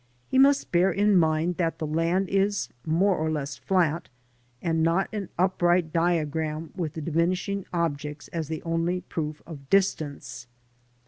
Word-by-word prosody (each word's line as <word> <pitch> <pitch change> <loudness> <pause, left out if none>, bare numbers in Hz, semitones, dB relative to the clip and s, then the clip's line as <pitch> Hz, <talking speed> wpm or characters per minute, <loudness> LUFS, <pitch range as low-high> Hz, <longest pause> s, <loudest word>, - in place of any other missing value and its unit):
" 125 - -39
He 260 - +4
must 275 +1 +4
bear 180 +2 +4
in 205 +3 +3
mind 160 0 +2
that 165 -2 0
the^land 165 +4 0
is 200 +1 0 0.2
more 185 +5 +3
or 160 -1 -1
less 145 -2 -3
flat, 170 -4 0 0.5
and 165 +2 0
not 165 +4 +2
an 205 -3 -4
upright 175 -2 +2
diagram 160 -2 0
with 170 -5 -3
the 160 - -5
diminishing 180 +5 -1
objects 150 -3 -2
as 165 -3 -3
the 160 0 -5
only 165 +2 -1
proof 150 -3 -5
of 140 -5 -11
distance. 145 -10 0
165 Hz, 150 wpm, -26 LUFS, 155-185 Hz, 0.5 s, He